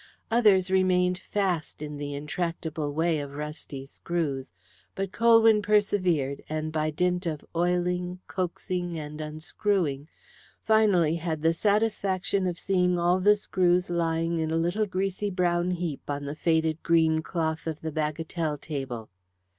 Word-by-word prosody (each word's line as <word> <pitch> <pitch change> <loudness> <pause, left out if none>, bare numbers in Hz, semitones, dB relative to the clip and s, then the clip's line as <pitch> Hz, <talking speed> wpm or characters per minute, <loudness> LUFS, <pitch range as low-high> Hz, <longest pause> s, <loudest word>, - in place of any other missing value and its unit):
Others 200 -5 +4
remained 180 -1 +3
fast 185 -7 -2
in 150 -1 -6
the 145 0 -4
intractable 155 0 -3
way 160 +1 +1
of 140 -1 -6
rusty 150 -2 -6
screws, 145 - -3 0.4
but 195 -1 -3
Colwyn 225 -2 +5
persevered, 185 -9 +1
and 155 0 -2
by 155 0 0
dint 180 +3 0
of 155 -3 -4
oiling, 180 +1 0
coaxing, 180 -1 -3
and 150 0 -6
unscrewing, 155 -1 -1 0.6
finally 195 -8 +3
had 160 -2 -3
the 165 0 +4
satisfaction 200 -1 +1
of 175 -1 -2
seeing 180 -1 +1
all 175 +2 +2
the 205 +3 +5
screws 180 -3 +1
lying 165 0 0
in 160 -1 -1
a 160 - 0
little 175 +6 0
greasy 195 +2 -2
brown 175 -2 +1
heap 175 -6 -3
on 145 0 -3
the 140 - -4
faded 160 0 +1
green 160 -1 +3
cloth 160 -3 -2
of 160 -2 -3
the 160 - -3
bagatelle 155 +1 -2
table. 135 -9 -5
170 Hz, 140 wpm, -27 LUFS, 155-185 Hz, 0.6 s, Colwyn